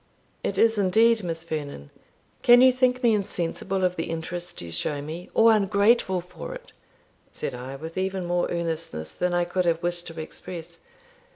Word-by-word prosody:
"It 195 - -2
is 225 0 +4
indeed, 220 +4 +4
Miss 165 -2 -4
Vernon. 145 - -6 0.5
Can 245 0 +7
you 260 0 +8
think 255 0 +1
me 235 -2 +5
insensible 190 -1 -2
of 180 0 +1
the 165 - -3
interest 175 +2 -5
you 85 -1 -7
show 145 - -2
me, 160 +5 -7
or 225 0 +7
ungrateful 200 -2 +3
for 180 - -8
it?" - - -13 0.6
said - - -4
I, 125 +2 -7
with 160 +5 -6
even 190 -1 -2
more 175 0 0
earnestness 165 - -3
than 180 0 -1
I 175 0 +2
could 180 +1 -1
have 170 0 +1
wished 175 0 -1
to 165 -1 -8
express. 170 +1 -7
175 Hz, 175 wpm, -25 LUFS, 165-200 Hz, 0.6 s, you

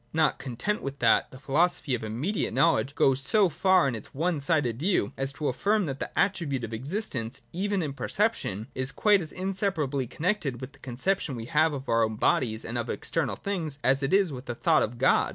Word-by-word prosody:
Not 155 -1 +2
content 135 - -2
with 140 0 -5
that, 115 -4 +3
the 130 - -12
philosophy 150 +1 +1
of 120 - -1
imme 115 - -2
diate - - -1
knowledge 150 -4 +2
goes 135 0 +3
so 195 +7 +3
far 185 -3 +3
in 135 - -1
its 110 +2 -9
one 165 +2 0
sided 140 -6 +1
view, 170 - +1
as 135 0 -2
to 150 +1 -3
affirm 205 - +1
that 135 -3 -4
the - - -3
attribute 165 -10 +1
of 115 0 -5
existence, 135 - -4
even 195 +1 0
in 145 -3 -3
perception, 155 - -1
is 130 +1 -1
quite 205 +3 +3
as 155 - -5
inseparably 185 - -1
connected 160 - -1
with 130 +1 -7
the - - -19
conception 135 +4 -1
we 115 -1 -6
have 155 +4 +2
of 135 -1 -6
our 115 0 +3
own 110 0 -1
bodies 110 0 +1
and 120 +1 -3
of 120 - -4
external 135 -11 -2
things, 165 - -3
as 135 +2 +3
it 135 - -1
is 195 -4 +3
with 130 -1 -7
the 120 - -3
thought - - +3
of 120 +2 -2
God. 130 - +3
140 Hz, 215 wpm, -27 LUFS, 125-180 Hz, -, that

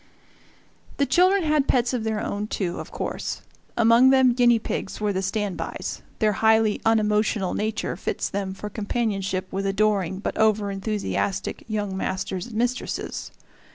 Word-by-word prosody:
The 280 - +3
children 365 +7 +4
had 300 -3 +2
pets 245 0 +2
of 240 -3 -1
their 220 -1 -1
own, 205 -1 -3
too, 180 -5 -2
of - - -7
course. - - -4 0.3
Among 230 +2 +6
them 260 -2 +5
guinea 240 -1 +5
pigs 215 - -4
were 210 -1 0
the 190 - -1
stand 195 0 -2
bys - - -5 0.2
their 215 -2 +3
highly 220 0 +3
unemotional 210 -3 +2
nature 215 -3 -2
fits 180 - -2
them 195 -1 -3
for 200 +2 -6
companionship 205 -3 -2
with 195 +1 -1
adoring 195 -2 +1
but 200 - -3
over 215 -2 +3
enthusiastic 200 -1 -2
young 205 -3 -2
masters 190 0 -3
and 235 - -10
mistresses. 245 +2 -2
215 Hz, 155 wpm, -24 LUFS, 195-230 Hz, 0.3 s, Among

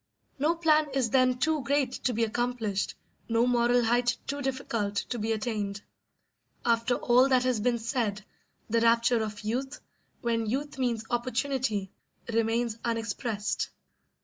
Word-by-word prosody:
No 310 +4 +2
plan 310 -2 +3
is 255 -4 +1
then 255 -1 +4
too 310 +3 +1
great 275 0 +1
to 255 - +3
be 230 - +1
accomplished, 225 -3 -1 0.3
no 230 +1 +3
moral 245 0 +3
height 240 +1 +2
too 285 +1 -3
difficult 240 -6 -2
to 240 +3 -2
be 220 +1 -1
attained. 210 -2 -2 0.8
After 235 +1 +2
all 250 +3 +4
that 255 -1 +4
has 255 -3 +1
been 240 +2 +1
said, 225 -4 -2 0.4
the 230 +1 +1
rapture 230 0 +4
of 215 -1 -4
youth, 260 +6 -3 0.4
when 230 -2 0
youth 270 +4 -3
means 235 -3 0
opportunity, 240 -4 -1 0.4
remains 230 0 0
unexpressed. 225 -2 -2
240 Hz, 140 wpm, -28 LUFS, 225-255 Hz, 0.8 s, then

